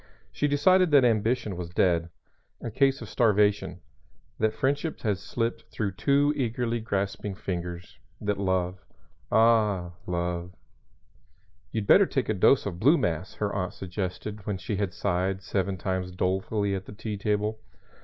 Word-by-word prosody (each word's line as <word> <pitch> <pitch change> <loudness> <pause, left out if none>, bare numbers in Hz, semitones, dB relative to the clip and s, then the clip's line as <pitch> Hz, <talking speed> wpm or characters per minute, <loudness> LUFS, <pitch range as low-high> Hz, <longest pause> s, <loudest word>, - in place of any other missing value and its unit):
She 145 - 0
decided 180 +6 +4
that 140 -4 +6
ambition 110 -2 +1
was 85 -1 -5
dead 85 -1 +2 0.5
a 115 - -5
case 135 +4 +2
of - - -8
starvation; 105 -3 +2 0.6
that 110 0 +2
friendship 145 +4 -1
had 105 -4 0
slipped 115 -1 -3
through 105 -3 -2
too 140 +9 +2
eagerly 120 -3 -1
grasping 100 -2 -2
fingers; 90 -3 -5 0.2
that 105 -1 -1
love 95 -1 -1 0.5
ah, 105 -5 +3 0.2
love! 85 0 -2 1.2
"You'd 110 -2 -2
better 195 - +6
take 130 -4 -1
a - - +3
dose 105 +7 +4
of 90 -4 -4
blue 145 - +5
mass," 85 - -2
her 105 -1 -2
aunt 90 -2 -2
suggested 95 +2 -5
when 100 -2 -1
she 95 +3 -3
had 100 -2 -1
sighed 95 +3 -1
seven 95 +1 -1
times 95 0 -2
dolefully 95 +3 0
at 95 -1 -3
the - - -8
tea 105 0 -5
table. 105 +1 -1
100 Hz, 150 wpm, -27 LUFS, 95-115 Hz, 1.2 s, that